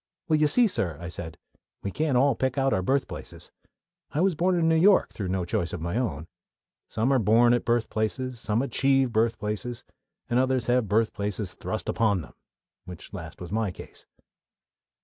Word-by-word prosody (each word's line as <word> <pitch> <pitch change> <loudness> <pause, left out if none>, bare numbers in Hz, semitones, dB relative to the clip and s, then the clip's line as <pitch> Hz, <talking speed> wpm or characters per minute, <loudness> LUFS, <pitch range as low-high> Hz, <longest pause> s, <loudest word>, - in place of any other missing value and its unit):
"Well, 155 -2 +3
you 150 - +4
see, 245 +11 +5
sir," 90 - -2
I 85 +1 -6
said, 80 -2 -7 0.5
"we 100 - -3
can't 150 -1 0
all 135 +2 +4
pick 130 +3 -2
out 135 0 +2
our 95 - +1
birthplaces. 135 +8 -3 0.6
I 150 - -3
was 190 0 +3
born 180 +4 +1
in 165 -1 +2
New 165 - +4
York 185 +4 +4
through 100 - -4
no 90 -1 -1
choice 85 -1 -2
of 90 - -4
my 85 +4 -3
own. 90 - -2 0.6
Some 120 +5 +1
are 130 - +4
born 115 +3 +4
at 120 - 0
birthplaces, 120 +1 -1
some 110 +4 0
achieve 135 -2 +2
birthplaces, 110 +1 -1 0.4
and 120 - +1
others 130 -1 +1
have 125 -2 +2
birthplaces 105 -2 -1
thrust - - -5
upon 105 -5 +1
them - - -14 0.5
which 90 +2 -11
last 80 -4 -8
was 90 0 -8
my 110 -1 0
case." 90 - -11
115 Hz, 180 wpm, -26 LUFS, 95-135 Hz, 0.6 s, see